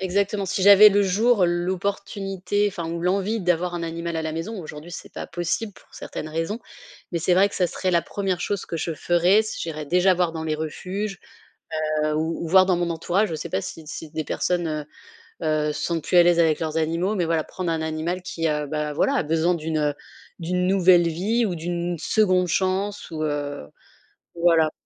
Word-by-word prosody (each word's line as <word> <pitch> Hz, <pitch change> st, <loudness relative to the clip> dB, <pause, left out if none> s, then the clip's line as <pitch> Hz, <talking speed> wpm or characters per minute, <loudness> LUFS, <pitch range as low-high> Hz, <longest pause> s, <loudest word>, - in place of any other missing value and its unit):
Exactement. 200 Hz, +2 st, 0 dB
Si 195 Hz, 0 st, -2 dB
j'avais 205 Hz, +1 st, +9 dB
le 205 Hz, 0 st, +3 dB
jour 205 Hz, +2 st, +3 dB
l'opportunité, 195 Hz, +3 st, -1 dB
enfin 170 Hz, -5 st, -4 dB
ou 170 Hz, -, -4 dB
l'envie 195 Hz, +5 st, 0 dB
d'avoir 175 Hz, 0 st, 0 dB
un 170 Hz, -1 st, -3 dB
animal 170 Hz, 0 st, -4 dB
à 160 Hz, -, -2 dB
la 160 Hz, 0 st, -3 dB
maison, 185 Hz, +6 st, -4 dB
aujourd'hui 155 Hz, +1 st, -9 dB
c'est -, -, -9 dB
pas -, -, -6 dB
possible 175 Hz, +5 st, -2 dB
pour -, -, -20 dB
certaines 155 Hz, -, -6 dB
raisons 165 Hz, +7 st, -2 dB, 0.5 s
mais 170 Hz, -, -1 dB
c'est 180 Hz, +2 st, +2 dB
vrai 195 Hz, +3 st, +5 dB
que -, -, -11 dB
ça 180 Hz, -2 st, +1 dB
serait 185 Hz, -1 st, -2 dB
la 170 Hz, -1 st, +3 dB
1re 190 Hz, -1 st, -2 dB
chose 200 Hz, -2 st, -2 dB
que 165 Hz, -, -4 dB
je 165 Hz, +1 st, -2 dB
ferais 175 Hz, +6 st, +3 dB
si 215 Hz, -, -6 dB
j'irais 155 Hz, -2 st, -5 dB
déjà 180 Hz, +4 st, +4 dB
voir 175 Hz, -2 st, +1 dB
dans 160 Hz, -1 st, -5 dB
les 155 Hz, -1 st, -1 dB
refuges, 190 Hz, +6 st, -4 dB, 0.8 s
heu, 155 Hz, 0 st, +1 dB
ou 160 Hz, +2 st, -2 dB
ou -, -, -3 dB
voir 185 Hz, +3 st, +6 dB
dans 185 Hz, -, +2 dB
mon 175 Hz, 0 st, -1 dB
entourage. 175 Hz, +5 st, 0 dB
Je 160 Hz, -, -3 dB
sais -, -, -6 dB
pas 95 Hz, -, -1 dB
si 160 Hz, +8 st, -8 dB
si 155 Hz, +1 st, -7 dB
des 155 Hz, +1 st, -3 dB
personnes, 175 Hz, +3 st, -1 dB
heu 155 Hz, -1 st, -3 dB, 0.6 s
heu, 150 Hz, -1 st, +1 dB
se -, -, -4 dB
sentent 165 Hz, -3 st, -2 dB
plus 180 Hz, -, +1 dB
à 175 Hz, -, +9 dB
l'aise 175 Hz, 0 st, +4 dB
avec 160 Hz, -2 st, +3 dB
leurs 160 Hz, 0 st, -1 dB
animaux 165 Hz, +6 st, 0 dB
mais 175 Hz, -3 st, 0 dB
voilà, 165 Hz, -1 st, 0 dB
prendre 180 Hz, -3 st, -4 dB
un 160 Hz, -1 st, -1 dB
animal 160 Hz, +3 st, -3 dB
qui 165 Hz, -3 st, -2 dB
a 150 Hz, -1 st, -1 dB
bah 150 Hz, 0 st, -3 dB
voilà, 270 Hz, -, +2 dB
a 275 Hz, -, +2 dB
besoin 165 Hz, +3 st, +1 dB
d'une, 160 Hz, -1 st, -3 dB
heu 150 Hz, -1 st, +1 dB, 0.4 s
d'une 180 Hz, +2 st, -1 dB
nouvelle 185 Hz, -2 st, +5 dB
vie 205 Hz, +9 st, 0 dB
ou 190 Hz, -5 st, -1 dB
d'une 175 Hz, +1 st, -3 dB
2de 185 Hz, -1 st, +2 dB
chance 195 Hz, +2 st, -1 dB
ou 155 Hz, -1 st, -3 dB
heu, 145 Hz, -, -3 dB, 0.7 s
voilà. 165 Hz, -2 st, +3 dB
175 Hz, 210 wpm, -24 LUFS, 160-190 Hz, 0.8 s, j'avais